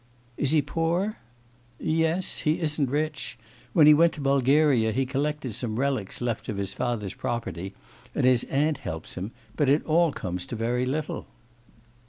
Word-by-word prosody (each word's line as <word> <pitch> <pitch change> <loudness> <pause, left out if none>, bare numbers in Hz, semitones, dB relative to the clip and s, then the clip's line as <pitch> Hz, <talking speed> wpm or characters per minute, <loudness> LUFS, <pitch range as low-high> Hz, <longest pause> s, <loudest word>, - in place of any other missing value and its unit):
'Is 140 - 0
he 150 -1 +3
poor?' 170 +8 -1 0.6
'Yes, 165 +3 0
he 155 +1 +1
isn't 150 -4 0
rich. 140 -4 -2 0.4
When 160 -4 +6
he 150 - +9
went 165 +2 +5
to - - -9
Bulgaria 135 -3 +3
he 130 +4 0
collected 140 -1 -2
some 110 -1 -3
relics 130 -7 -1
left 120 -2 -2
of 105 - -3
his 100 -1 -2
father's 115 -6 -2
property, 100 -6 -4 0.4
and - - +2
his 125 -1 +4
aunt 150 +3 +1
helps 80 -2 -6
him; 95 +4 -4 0.3
but 145 0 +2
it 145 +3 +3
all 165 0 +3
comes 90 -7 -4
to - - -5
very 120 +3 0
little. 150 +3 -3
135 Hz, 165 wpm, -26 LUFS, 120-155 Hz, 0.6 s, he